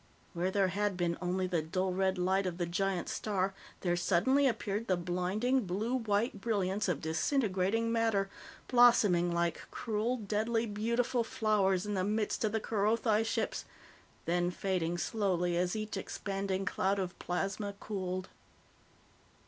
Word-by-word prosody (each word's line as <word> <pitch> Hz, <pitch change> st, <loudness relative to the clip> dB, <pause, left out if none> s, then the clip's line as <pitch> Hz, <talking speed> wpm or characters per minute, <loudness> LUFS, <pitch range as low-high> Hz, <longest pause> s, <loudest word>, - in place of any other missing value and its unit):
Where 175 Hz, +1 st, 0 dB
there 195 Hz, -1 st, +2 dB
had 200 Hz, 0 st, -1 dB
been 170 Hz, -1 st, 0 dB
only 185 Hz, +1 st, 0 dB
the 175 Hz, -3 st, 0 dB
dull 185 Hz, +4 st, -1 dB
red 190 Hz, 0 st, +1 dB
light 190 Hz, +2 st, +1 dB
of 175 Hz, -2 st, -4 dB
the 175 Hz, -, 0 dB
giant 180 Hz, +1 st, -1 dB
star, 195 Hz, -2 st, -1 dB, 0.3 s
there 175 Hz, -2 st, +1 dB
suddenly 205 Hz, +11 st, +3 dB
appeared 220 Hz, -2 st, -2 dB
the 185 Hz, -, +2 dB
blinding, 190 Hz, +8 st, 0 dB
blue 210 Hz, +7 st, -1 dB
white 220 Hz, -3 st, 0 dB
brilliance 205 Hz, -2 st, 0 dB
of 165 Hz, -6 st, -1 dB
disintegrating 200 Hz, -, +1 dB
matter, 225 Hz, -4 st, +2 dB, 0.4 s
blossoming 210 Hz, -8 st, +5 dB
like 170 Hz, 0 st, 0 dB
cruel, 225 Hz, +2 st, -1 dB
deadly, 225 Hz, +2 st, 0 dB
beautiful 235 Hz, +3 st, 0 dB
flowers 205 Hz, -4 st, +1 dB
in 210 Hz, -, -2 dB
the 185 Hz, -2 st, 0 dB
midst 210 Hz, +3 st, 0 dB
of 215 Hz, -, +1 dB
the 220 Hz, -, 0 dB
Kerothi 220 Hz, +1 st, +1 dB
ships, 225 Hz, -, -1 dB, 0.6 s
then 175 Hz, +1 st, +1 dB
fading 180 Hz, -2 st, -1 dB
slowly 180 Hz, -3 st, 0 dB
as 180 Hz, +2 st, 0 dB
each 215 Hz, 0 st, -3 dB
expanding 195 Hz, -1 st, -3 dB
cloud 195 Hz, 0 st, +1 dB
of 185 Hz, -2 st, -4 dB
plasma 195 Hz, +3 st, -2 dB
cooled. 185 Hz, -3 st, -3 dB
195 Hz, 145 wpm, -32 LUFS, 180-220 Hz, 0.6 s, blossoming